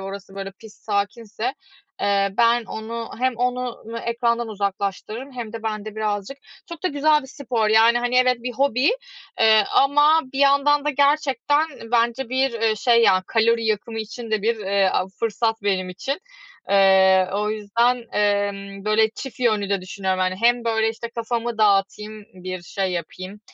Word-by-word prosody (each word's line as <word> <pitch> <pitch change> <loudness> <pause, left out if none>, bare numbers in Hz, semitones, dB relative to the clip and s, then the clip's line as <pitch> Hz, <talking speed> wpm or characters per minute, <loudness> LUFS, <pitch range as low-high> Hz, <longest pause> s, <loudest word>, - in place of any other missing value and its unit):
orası, 195 0 -8
böyle, 195 0 -6
pist 215 +2 -17
sakinse, 215 +3 -3 0.5
eee, 200 -1 +1
ben 235 0 +3
onu 225 +1 -6
hem 255 -1 +1
onu 250 -1 -2
n 230 - -4
ekrandan 235 0 -1
uzaklaştırırım 205 +5 -4
hem 235 -3 -7
de 230 -1 -7
ben 215 -2 -3
de 215 0 -8
birazcık 210 +4 -3 0.3
Çok 340 0 -9
da - - +3
güzel 300 0 +2
bir - - -11
spor 245 -5 -2
yani. 225 +2 +5
Hani, 245 +1 -1
evet, 255 -1 +4
bir 250 - -4
hobi, 270 +1 +2 0.5
eee, 220 -1 +5
ama 295 +3 +5
bir 270 - -5
yandan 280 +1 +3
da 300 - +1
gerçekten 290 +1 +2 0.3
bence 235 +2 +1
bir, 260 0 0
eee, 220 -1 +2
şey 235 +2 +3
ya, 185 -4 +4
kalori 230 0 +2
yakımı 220 +1 -2
için 225 +1 -7
de 215 -2 0
bir, 230 +1 +1
eee, 195 -1 +1
a 185 - 0
fırsat 225 -1 -1
benim 190 -2 0
için. 270 - -4 0.5
Eee, 190 -1 +5
o 210 +1 -1
yüzden, 225 +4 +1 0.2
emm, 200 -1 -1
böyle 215 +1 +3
çift 260 +2 -9
yönlü 215 -5 +1
de 200 -2 +1
düşünüyorum 185 0 -3
yani. 185 0 0
Hem 240 +1 +3
böyle, 225 -1 +1
işte, 230 +1 -7
kafamı 235 0 -3
dağıtayım, 210 +1 +1
bir 185 -1 -7
şey 190 +1 -3
yapayım, 185 +4 -6
225 Hz, 170 wpm, -22 LUFS, 200-245 Hz, 0.5 s, yani